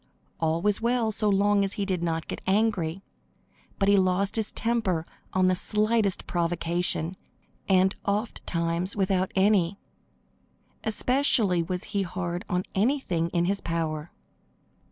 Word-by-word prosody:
All 165 Hz, +1 st, 0 dB
was 210 Hz, 0 st, +1 dB
well 235 Hz, -1 st, +1 dB
so 210 Hz, 0 st, 0 dB
long 200 Hz, 0 st, +3 dB
as 195 Hz, -, -1 dB
he 200 Hz, -3 st, -2 dB
did 185 Hz, -3 st, -1 dB
not 165 Hz, -1 st, -2 dB
get -, -, -5 dB
angry, 195 Hz, -4 st, +1 dB, 0.7 s
but 195 Hz, -, +1 dB
he 200 Hz, 0 st, +5 dB
lost 190 Hz, +2 st, +1 dB
his 220 Hz, -1 st, -1 dB
temper 220 Hz, -8 st, 0 dB, 0.3 s
on 185 Hz, 0 st, +2 dB
the 185 Hz, 0 st, +3 dB
slightest 210 Hz, +1 st, +1 dB
provocation, 170 Hz, 0 st, 0 dB, 0.5 s
and 190 Hz, 0 st, +4 dB
ofttimes 185 Hz, -4 st, -1 dB
without 190 Hz, -2 st, +1 dB
any. 195 Hz, -2 st, +3 dB, 1.1 s
Especially 220 Hz, -5 st, +2 dB
was 180 Hz, +2 st, -3 dB
he 200 Hz, -, -2 dB
hard 175 Hz, -1 st, -4 dB
on 180 Hz, 0 st, 0 dB
anything 195 Hz, -, +1 dB
in 170 Hz, 0 st, +1 dB
his 195 Hz, +2 st, -1 dB
power. 160 Hz, -1 st, -3 dB
190 Hz, 135 wpm, -27 LUFS, 170-205 Hz, 1.1 s, he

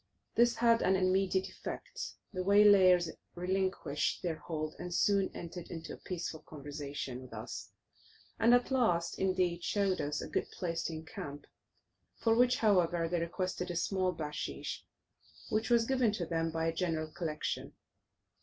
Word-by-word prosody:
This 235 Hz, 0 st, +4 dB
had 230 Hz, 0 st, +4 dB
an 190 Hz, -, +3 dB
immediate 190 Hz, 0 st, +2 dB
effect; -, -, -6 dB, 0.2 s
the 185 Hz, -, -2 dB
waylayers 190 Hz, -4 st, +6 dB, 0.2 s
relinquished 185 Hz, -4 st, -1 dB
their 165 Hz, -3 st, -1 dB
hold, 155 Hz, -2 st, -4 dB
and 180 Hz, -, -5 dB
soon 195 Hz, +2 st, +3 dB
entered 170 Hz, 0 st, -7 dB
into 165 Hz, -1 st, -6 dB
a -, -, -8 dB
peaceful 170 Hz, -3 st, -5 dB
conversation 145 Hz, -3 st, -6 dB
with 130 Hz, -, -12 dB
us; -, -, -6 dB, 0.7 s
and 230 Hz, -, +5 dB
at 245 Hz, +2 st, +1 dB
last, 175 Hz, -10 st, +1 dB
indeed, 185 Hz, -2 st, +1 dB
showed 195 Hz, -3 st, +1 dB
us 145 Hz, 0 st, -2 dB
a -, -, -4 dB
good -, -, -2 dB
place 165 Hz, -2 st, -2 dB
to 165 Hz, -, -2 dB
encamp, 150 Hz, -2 st, -7 dB, 0.7 s
for 225 Hz, -, +3 dB
which, 250 Hz, +1 st, +4 dB
however, 175 Hz, -6 st, +3 dB
they 175 Hz, +1 st, 0 dB
requested 180 Hz, +2 st, -2 dB
a 175 Hz, -, -3 dB
small 185 Hz, +2 st, +1 dB
bachshish, 150 Hz, -3 st, -4 dB, 0.7 s
which 220 Hz, +2 st, +1 dB
was 235 Hz, -1 st, +4 dB
given 255 Hz, -3 st, +2 dB
to 180 Hz, -5 st, -2 dB
them 165 Hz, 0 st, 0 dB
by 160 Hz, 0 st, -1 dB
a 165 Hz, -, +1 dB
general 160 Hz, -2 st, -1 dB
collection. 155 Hz, -3 st, -3 dB
180 Hz, 155 wpm, -33 LUFS, 165-195 Hz, 0.7 s, waylayers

